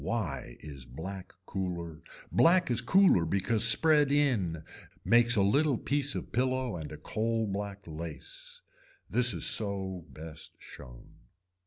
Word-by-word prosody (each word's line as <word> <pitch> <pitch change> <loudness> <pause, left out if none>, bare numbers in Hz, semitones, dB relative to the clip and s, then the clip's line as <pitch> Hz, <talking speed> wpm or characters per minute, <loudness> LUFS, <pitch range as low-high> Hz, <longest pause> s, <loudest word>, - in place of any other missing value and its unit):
Why 85 - -4
is 70 -4 -9
black 90 +9 -8
cooler, 85 -5 -5 0.3
black 175 -3 +4
is 120 - +2
cooler 190 - +4
because 100 +6 0
spread 145 +5 +5
in 110 - +1 0.4
makes 120 +1 +4
a 100 - +3
little 140 +6 +2
piece 140 +2 -1
of - - -6
pillow 130 -2 -1
and 80 -3 -7
a 75 - -8
coal 110 +7 -2
black 100 0 -5
lace. 80 -1 -9 0.5
This 120 +2 +4
is 85 -5 -3
so 95 -4 -1
best 80 0 -9
shown. - - -13
100 Hz, 135 wpm, -30 LUFS, 85-125 Hz, 0.5 s, spread